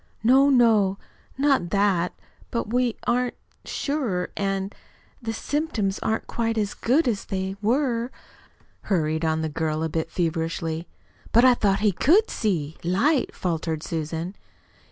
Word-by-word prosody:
"No, 265 +4 +6
no, 220 -7 +4 0.4
not 270 -11 +2
that; 195 -3 +1 0.3
but 230 -1 -3
we 245 -2 +2
aren't 250 +1 +1 0.3
SURE. 250 -12 -2
And 195 0 -2
and - - -27 0.5
the 225 -2 -3
symptoms 225 -5 -1
aren't 220 - -1
quite 230 -1 -1
so 210 -2 0
good 265 +6 +3
as 215 -5 -1
they 190 0 -3
were," 240 +1 +1 0.8
hurried 160 -4 +1
on 160 0 +1
the - - 0
girl 155 0 -2
a 160 - -1
bit 160 +1 -2
feverishly. 165 -1 -2 0.4
"But 235 +3 +6
I 255 - +8
thought 200 -4 +1
he 210 -1 +4
could 360 - +3
see 160 -8 -1
light," 235 - +1
faltered 160 -3 -2
Susan. 165 +2 -3
200 Hz, 140 wpm, -25 LUFS, 170-240 Hz, 0.8 s, I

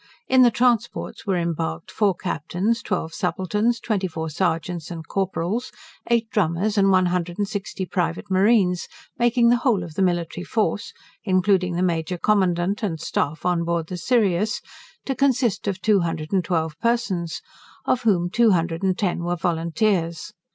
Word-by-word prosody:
In 260 0 +5
the 245 - +7
transports 240 -1 0
were 190 -2 +1
embarked 150 - -3
four 205 -4 +2
captains, 185 +6 -2
twelve 160 -4 -3
subalterns, 210 +5 0
twenty 205 -5 -1
four 160 -2 -5
serjeants 170 0 -2
and 165 -2 -7
corporals, 195 +4 -2 0.4
eight 235 -1 +2
drummers, 195 +2 +1
and 195 -1 +4
one 185 -1 +4
hundred 175 -1 -1
and 205 -1 0
sixty 200 -2 -4
private 175 0 -2
marines, 190 -2 +3 0.3
making 240 0 +4
the 240 - +5
whole 235 -7 +1
of 170 -2 -9
the 195 - -2
military 175 -1 0
force, 210 -1 -1 0.3
including 185 -2 +2
the 180 - 0
Major 170 0 -1
Commandant 190 -1 +1
and 175 -7 -2
Staff 150 +1 -2
on 175 -1 +1
board 170 -1 -1
the 180 - -4
Sirius, 210 0 +1 0.5
to 270 - -1
consist 255 -6 +1
of 195 -2 -1
two 205 +1 +3
hundred 165 -1 -3
and 190 -2 +2
twelve 160 -3 -2
persons, 225 -8 -1 0.4
of 255 - +1
whom 180 -7 +2
two 235 +2 +4
hundred 165 -1 -1
and 190 -1 +1
ten 180 -4 -1
were 175 +1 -1
volunteers. 170 0 -1
185 Hz, 165 wpm, -23 LUFS, 170-215 Hz, 0.5 s, the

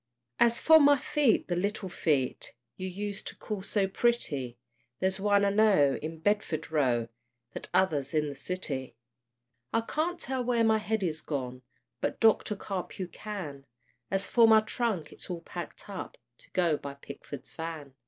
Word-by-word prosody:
As 235 0 +4
for 320 -1 +8
my 285 -1 +6
feet, 275 -2 +2
the 175 - 0
little 200 +2 -1
feet 145 -10 0 0.2
You 185 - -4
used 200 +2 -4
to - - -5
call 210 -3 -5
so 200 0 +1
pretty, 150 - 0 0.4
There's 190 +1 0
one, 200 0 +3
I 200 - +3
know, 195 -10 +4
in 160 +1 -5
Bedford 165 -4 0
Row, 125 -7 +2 0.5
The - - -4
t'other's 160 -7 +1
in 150 -1 +2
the 145 - -4
City. 140 -3 -4 0.8
I 225 - +2
can't 320 +9 -2
tell 260 0 -2
where 240 -1 +2
my 220 -1 +4
head 215 -1 -1
is 160 -3 -1
gone, 130 -4 -4 0.4
But - - -2
Doctor 220 -1 +4
Carpue 190 -2 -5
can; 155 -10 -7 0.4
As 195 +1 0
for 230 -2 +6
my 220 -1 +7
trunk, 215 -7 -2
it's - - -10
all 175 -2 -4
packed - - -8
up - - -7 0.2
To - - -19
go 170 -4 +2
by 140 -1 -7
Pickford's 140 -1 -9
van. 160 -4 -6
190 Hz, 165 wpm, -29 LUFS, 150-220 Hz, 0.8 s, for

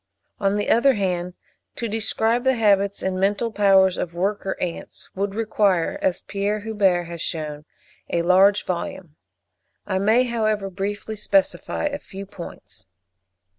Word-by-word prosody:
On 195 -1 +1
the 205 - 0
other 265 +4 +4
hand, 180 -3 -2 0.4
to 235 - -3
describe 225 +2 0
the 265 0 +3
habits 200 -3 +2
and 185 -1 -1
mental 205 +4 +1
powers 195 -3 +4
of 170 -1 -4
worker 195 +2 -1
ants, 175 -2 -5
would 200 +1 -2
require, 205 -6 +1
as 180 - 0
Pierre 205 +1 -2
Huber 200 -5 +1
has 170 -1 -7
shewn, 150 -3 -4 0.4
a 170 - 0
large 190 +3 +4
volume; 175 -2 -5 0.7
I 190 -2 -1
may, 220 +5 +4
however, 215 -5 -1
briefly 205 +3 -4
specify 290 +7 0
a 290 0 -2
few 195 -5 -9
points. 170 - -11
200 Hz, 140 wpm, -23 LUFS, 185-215 Hz, 0.7 s, other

